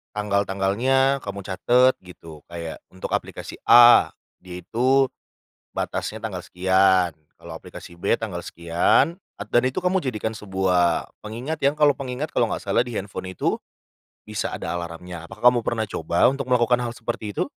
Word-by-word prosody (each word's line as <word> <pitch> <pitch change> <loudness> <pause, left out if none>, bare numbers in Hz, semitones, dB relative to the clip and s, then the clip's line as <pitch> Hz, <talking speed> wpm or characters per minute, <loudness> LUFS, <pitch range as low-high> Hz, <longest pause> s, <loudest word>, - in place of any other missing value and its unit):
tanggal-tanggalnya 105 +7 +1
kamu 100 -4 -7
catet 125 +7 +3
gitu, 85 -4 -13
kayak 85 -2 -7
untuk 95 - -8
aplikasi - - -4
A, 120 0 +8 0.2
dia 90 -1 -9
itu 130 +6 +2 0.6
batasnya 110 0 -3
tanggal 100 -5 -4
sekian, 95 0 +2 0.2
kalau - - -12
aplikasi 85 0 -12
B - - +2
tanggal 105 -7 -5
sekian, 85 - +1 0.2
at - - -8
dan 120 +1 +4
itu 130 +8 -3
kamu 185 +1 +2
jadikan 110 - -3
sebuah 95 -5 0
pengingat 120 +9 -5
yang 140 +2 +2
kalau 150 -1 +5
pengingat 135 +2 -5
kalau 120 - +2
nggak - - -4
salah 100 +4 +2
di 120 - -6
handphone 95 -2 -5
itu, - - -1 0.7
bisa 105 -1 -3
ada 85 - -4
alarmnya. 85 0 -6
Apakah 120 +5 +4
kamu 120 - 0
pernah 110 -1 -1
coba 85 -3 +1
untuk 135 -1 -1
melakukan 125 0 +3
hal 120 - -2
seperti 115 -2 -5
itu? - - -2
105 Hz, 155 wpm, -23 LUFS, 90-125 Hz, 0.7 s, A